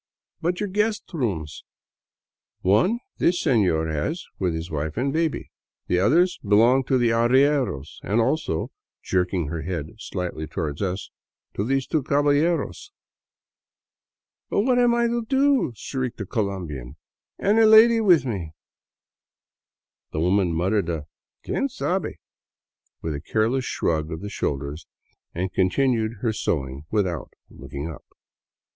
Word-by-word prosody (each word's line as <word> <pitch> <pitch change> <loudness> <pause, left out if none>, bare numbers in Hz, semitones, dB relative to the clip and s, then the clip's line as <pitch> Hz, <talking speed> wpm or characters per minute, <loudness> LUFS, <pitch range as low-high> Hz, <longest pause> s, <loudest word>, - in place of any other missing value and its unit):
" - - -52
But 175 +2 0
your 210 - -1
guest 210 +2 0
rooms? 95 - -3 0.3
" - - -70
" - - -70
One 115 - +3 0.2
this 175 +1 +3
senor 95 - +2
has 80 - -2
with 90 -3 0
his 80 +1 -5
wife 75 +2 -3
and 135 +3 0
baby. 160 -1 -1 0.3
The 90 - +1
other 155 - +5 0.2
belongs 115 +6 +4
to 130 - +3
the 120 -2 +3
arrieros 120 - +2
— - - -31
and 105 +5 +1
also," 115 - 0 0.3
jerking 90 -4 0
her 85 0 -3
head 80 -3 -4
slightly 90 -6 -4
toward 75 -3 -4
us, 95 0 -3 0.2
" - - -59
to 100 - -2
these 135 +3 0
two 155 - 0
caballeros." 145 - +1 0.8
" - - -70
But - - +2
what 250 +2 +2
am 240 -1 +4
I 235 0 +2
to 235 0 0
do? 270 - +2
" - - -25
shrieked 130 +1 -4
the 100 - -4
Colombian, 90 - -4 0.2
" - - -69
and 210 +3 +2
a 225 - +7
lady 225 +1 +7
with 175 - +5
me?" 95 -10 -4 1.6
The 75 - -1
woman 90 +2 +2
muttered 90 +3 0
a 80 -3 -3 0.2
" - - -38
Quien 275 - -1
sabe 190 - -2 0.4
" - - -52
with 80 - -2
a 70 - -5
careless 115 - 0
shrug 80 -6 -1
of 80 +1 -5
the 105 - -5
shoulders 70 -2 -3 0.5
and 90 +2 -2
continued 110 +2 +1
her 115 -3 0
sewing 70 -8 -2
without 95 - -1 0.2
looking 70 +2 -7
up. 80 - -8
110 Hz, 155 wpm, -24 LUFS, -, 1.6 s, a